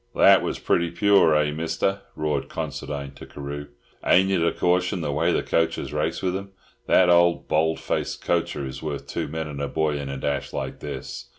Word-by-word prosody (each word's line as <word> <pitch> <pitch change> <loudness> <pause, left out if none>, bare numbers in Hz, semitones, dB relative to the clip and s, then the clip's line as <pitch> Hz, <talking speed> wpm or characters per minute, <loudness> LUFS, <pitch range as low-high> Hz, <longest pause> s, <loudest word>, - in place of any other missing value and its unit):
"That 100 -1 +7
was - - -2
pretty 85 0 +1
pure, 95 -3 +4
eh, 75 -1 +2
Mister?" 85 +5 -1
roared 75 -3 -2
Considine 70 -1 -5
to 70 - -12
Carew. 70 0 -6 0.4
"Ain't 95 +1 +4
it 90 -4 +2
a 85 - +3
caution 90 +1 +1
the 75 - -2
way 80 +4 +1
the - - +1
coachers 80 -2 0
race 75 +4 -1
with 90 -1 0
'em? 100 0 -6 0.3
That 90 - +5
old 85 0 +4
bald 80 +1 +1
face - - -2
coacher 80 -4 -1
is 65 - -7
worth 75 -3 -4
two 80 -2 -3
men 80 +1 -4
and 70 -1 -6
a 70 - -1
boy 75 -1 0
in 70 -1 -5
a 70 - -4
dash 70 +1 -2
like - - -4
this." - - -7
80 Hz, 200 wpm, -24 LUFS, 75-90 Hz, 0.4 s, That